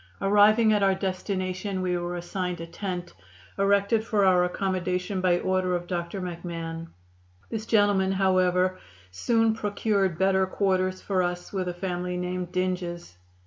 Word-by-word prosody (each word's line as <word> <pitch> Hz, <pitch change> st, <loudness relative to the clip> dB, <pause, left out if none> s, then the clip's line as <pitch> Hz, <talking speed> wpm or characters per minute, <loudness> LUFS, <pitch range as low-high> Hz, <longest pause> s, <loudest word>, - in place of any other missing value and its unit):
Arriving 215 Hz, +3 st, +5 dB
at 210 Hz, -, +2 dB
our 195 Hz, -1 st, +3 dB
destination, 185 Hz, 0 st, -3 dB
we 180 Hz, -1 st, 0 dB
were 175 Hz, 0 st, -3 dB
assigned 180 Hz, 0 st, -3 dB
a 165 Hz, -, -5 dB
tent, 175 Hz, 0 st, -5 dB, 0.5 s
erected 200 Hz, +2 st, +3 dB
for 210 Hz, -3 st, +2 dB
our 180 Hz, -1 st, +5 dB
accommodation 185 Hz, 0 st, -2 dB
by 180 Hz, -1 st, +3 dB
order 185 Hz, -1 st, 0 dB
of 175 Hz, 0 st, -3 dB
Dr. 175 Hz, +1 st, -3 dB
McMahon. 165 Hz, -2 st, -5 dB, 0.6 s
This 220 Hz, -1 st, -4 dB
gentleman, 205 Hz, -3 st, +3 dB
however, 185 Hz, -1 st, +2 dB, 0.3 s
soon 225 Hz, -, +2 dB
procured 205 Hz, -4 st, 0 dB
better 190 Hz, 0 st, +2 dB
quarters 185 Hz, -1 st, 0 dB
for 190 Hz, -2 st, +1 dB
us 180 Hz, +1 st, -3 dB
with 185 Hz, -2 st, -2 dB
a 180 Hz, -, -2 dB
family 180 Hz, 0 st, -3 dB
named 180 Hz, 0 st, -3 dB
Dinges. 180 Hz, -, -3 dB
185 Hz, 145 wpm, -26 LUFS, 180-195 Hz, 0.6 s, Arriving